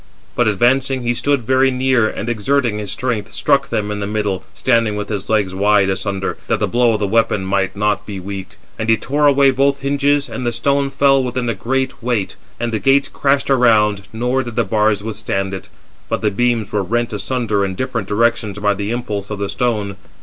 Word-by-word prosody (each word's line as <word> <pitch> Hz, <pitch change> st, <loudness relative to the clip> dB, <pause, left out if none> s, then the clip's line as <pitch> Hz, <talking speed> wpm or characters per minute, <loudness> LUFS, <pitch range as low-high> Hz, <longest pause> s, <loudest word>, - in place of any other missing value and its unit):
But 120 Hz, -, +2 dB
advancing, 130 Hz, +5 st, +2 dB
he 120 Hz, 0 st, +1 dB
stood 135 Hz, +2 st, 0 dB
very 130 Hz, +3 st, +3 dB
near, 130 Hz, -3 st, +2 dB
and 110 Hz, -, -5 dB
exerting 120 Hz, 0 st, 0 dB
his 105 Hz, -2 st, -5 dB
strength, 115 Hz, -1 st, -3 dB
struck -, -, +2 dB
them 105 Hz, -1 st, -1 dB
in 105 Hz, -, -3 dB
the 100 Hz, -, -3 dB
middle, 105 Hz, -3 st, -2 dB
standing 115 Hz, -4 st, +1 dB
with 105 Hz, 0 st, -4 dB
his 100 Hz, -2 st, -4 dB
legs 105 Hz, -4 st, +1 dB
wide 100 Hz, 0 st, +3 dB
asunder, 95 Hz, 0 st, -3 dB
that -, -, +1 dB
the -, -, +2 dB
blow 120 Hz, -1 st, +2 dB
of 110 Hz, -, -1 dB
the 105 Hz, -, 0 dB
weapon 105 Hz, -2 st, +1 dB
might 95 Hz, 0 st, 0 dB
not 105 Hz, 0 st, 0 dB
be 100 Hz, -2 st, -5 dB
weak. 95 Hz, 0 st, -7 dB, 0.2 s
And 110 Hz, 0 st, -2 dB
he 110 Hz, -, +5 dB
tore 145 Hz, +5 st, +1 dB
away 140 Hz, -1 st, +5 dB
both 140 Hz, +1 st, +1 dB
hinges, 140 Hz, +1 st, +1 dB
and 130 Hz, -, -6 dB
the 120 Hz, -, 0 dB
stone 140 Hz, +4 st, +1 dB
fell 135 Hz, -1 st, +3 dB
within 125 Hz, 0 st, -2 dB
with 115 Hz, -, -1 dB
a -, -, -22 dB
great 130 Hz, +2 st, -2 dB
weight; 115 Hz, -5 st, -1 dB, 0.2 s
and 120 Hz, 0 st, -2 dB
the 110 Hz, -, -1 dB
gates 140 Hz, +2 st, +3 dB
crashed 140 Hz, 0 st, +1 dB
around; 105 Hz, -6 st, +3 dB
nor 125 Hz, +4 st, 0 dB
did 120 Hz, -3 st, -7 dB
the 120 Hz, -, +2 dB
bars 105 Hz, 0 st, +1 dB
withstand 95 Hz, -3 st, -3 dB
it, 95 Hz, -, -7 dB, 0.4 s
but -, -, -1 dB
the 105 Hz, -, +2 dB
beams 120 Hz, 0 st, 0 dB
were 105 Hz, -, 0 dB
rent 120 Hz, +4 st, -1 dB
asunder 105 Hz, -1 st, -1 dB
in 95 Hz, -1 st, -2 dB
different 115 Hz, -2 st, -3 dB
directions 110 Hz, -1 st, 0 dB
by 105 Hz, 0 st, +1 dB
the 100 Hz, +1 st, -4 dB
impulse 105 Hz, -4 st, -3 dB
of 105 Hz, -, -4 dB
the 100 Hz, 0 st, -3 dB
stone. 105 Hz, -3 st, -1 dB
115 Hz, 215 wpm, -18 LUFS, 105-130 Hz, 0.4 s, he